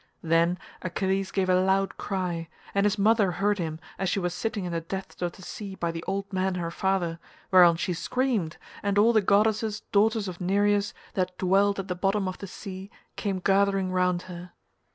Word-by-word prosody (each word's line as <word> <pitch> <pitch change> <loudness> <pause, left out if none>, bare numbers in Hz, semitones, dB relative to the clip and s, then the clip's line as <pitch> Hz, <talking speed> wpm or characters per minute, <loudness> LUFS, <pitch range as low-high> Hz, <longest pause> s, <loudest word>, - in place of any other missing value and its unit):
Then 165 +2 +3 0.2
Achilles 190 +1 -1
gave 190 -1 0
a 185 0 +4
loud 195 +1 +1
cry 180 -4 -3 0.2
and 200 +1 +3
his 205 - 0
mother 205 -2 +3
heard 200 +3 +1
him 160 -2 -3 0.2
as 190 - 0
she - - 0
was 175 -2 -1
sitting 210 +1 -3
in 175 - -3
the 165 -1 -1
depths 190 +4 -7
of 175 -1 -1
the 190 - -14
sea 195 +1 -7
by 170 -2 -2
the 165 0 -6
old 195 +1 -3
man 190 0 0
her 170 -2 -3
father, 175 -3 0 0.3
whereon 175 -3 +7
she 175 +2 -1
screamed, 215 -3 -1 0.2
and 200 0 0
all 225 +3 +5
the 215 - +5
goddesses 210 +2 +2
daughters 215 0 +3
of 180 0 -7
Nereus 205 +2 +2 0.2
that 185 -1 -1
dwelt 195 +2 +3
at 195 -1 -4
the 180 - -1
bottom 195 +2 0
of 185 - -5
the 200 - -6
sea, 190 +1 -8 0.3
came 200 -3 -2
gathering 195 0 +2
round 180 -1 +1
her. 180 -1 -9
190 Hz, 195 wpm, -27 LUFS, 180-200 Hz, 0.3 s, whereon